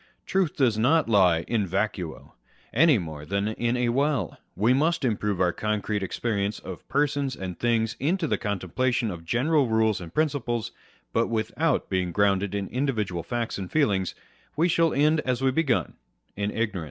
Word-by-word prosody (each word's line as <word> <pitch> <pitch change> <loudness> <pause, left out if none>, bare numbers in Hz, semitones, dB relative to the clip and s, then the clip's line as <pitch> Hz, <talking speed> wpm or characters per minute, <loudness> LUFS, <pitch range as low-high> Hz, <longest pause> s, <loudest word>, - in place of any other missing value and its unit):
Truth 190 -4 0
does 120 -6 +2
not 145 +6 +3
lie 95 -7 +4
in 105 +1 -1
vacuo, 95 -3 -3 0.4
any 150 +2 +5
more 80 -6 -6
than 100 +6 -1
in 120 +2 -1
a 125 -1 +1
well. 135 - 0 0.2
We 115 +5 +3
must 155 +2 +1
improve 105 -4 0
our 90 -2 +2
concrete 105 -1 -2
experience 100 +1 -2
of 90 -3 -9
persons 140 -1 0
and 95 -2 -6
things 115 -1 +1
into 170 +5 0
the - - 0
contemplation 110 +4 -1
of 85 -2 -8
general 135 - +2
rules 110 -3 +2
and 85 -2 -8
principles; 120 - -1 0.4
but 115 - +2
without 120 +7 0
being 90 -2 -1
grounded 100 0 +1
in 100 -1 -2
individual 110 -10 -1
facts 120 +1 -3
and 95 -2 -6
feelings, 100 - +1 0.4
we 165 +3 +3
shall 165 -1 +3
end 150 +2 +3
as 130 -3 -1
we 135 - +3
began, 135 -3 0 0.4
in 100 0 -1
ignorance. 105 -4 -2
115 Hz, 165 wpm, -26 LUFS, 100-135 Hz, 0.4 s, any